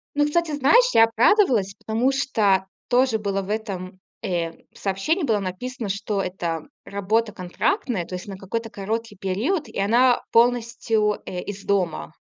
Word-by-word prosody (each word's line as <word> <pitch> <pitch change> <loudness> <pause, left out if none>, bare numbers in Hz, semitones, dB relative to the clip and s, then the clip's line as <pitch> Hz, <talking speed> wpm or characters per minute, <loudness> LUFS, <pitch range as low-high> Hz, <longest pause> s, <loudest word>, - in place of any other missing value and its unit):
Ну, 290 0 +3
кстати, 330 +2 0
знаешь, 300 - +4
я 225 - +7
обрадовалась, 225 - +3
потому 230 +5 0
что 210 -9 +2 0.2
тоже 250 -2 +3
было 200 -2 -2
в 195 - -9
этом, 190 -4 -4 0.2
э, 170 -2 -1 0.2
сообщении, 205 - -1
было 220 -6 +2
написано, 220 +5 -5
что 200 +1 -1
это 170 -4 -3 0.2
работа 210 +3 0
контрактная, 200 - -1
то 185 - -6
есть 180 - -7
на 195 - -6
какой-то 225 +4 -4
короткий 220 +3 -4
период 215 - -1
и - - -6
она 240 +5 +4
полностью, 230 -3 +2
э, 180 -1 -4
из 200 -1 -7
дома. 175 - -1
215 Hz, 150 wpm, -23 LUFS, 195-245 Hz, 0.2 s, я